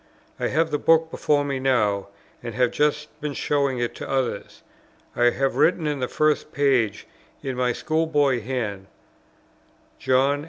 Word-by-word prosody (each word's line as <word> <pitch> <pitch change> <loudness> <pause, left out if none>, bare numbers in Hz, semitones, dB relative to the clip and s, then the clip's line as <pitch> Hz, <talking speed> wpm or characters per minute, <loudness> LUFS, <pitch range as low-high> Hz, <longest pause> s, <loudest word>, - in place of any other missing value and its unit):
I - - 0
have 160 +2 +1
the 150 - 0
book 165 0 +3
before 145 -1 +1
me 140 -2 -2
now, 105 -7 +1 0.3
and 120 -2 -6
have 125 0 +2
just 150 0 0
been 145 -1 -3
showing 140 -3 0
it 120 -1 -2
to - - -7
others. 130 -2 -3 0.5
I 120 - +2
have 135 +2 -1
written 170 -1 +3
in 150 -2 -1
the 125 - -1
first 155 +1 0
page, 130 -7 +1 0.4
in 135 -1 -3
my 125 0 +1
school 160 +5 -1
boy 145 -5 +2
hand, 105 -5 -4 1.1
"John. 135 +2 +2
135 Hz, 160 wpm, -24 LUFS, 125-150 Hz, 1.1 s, book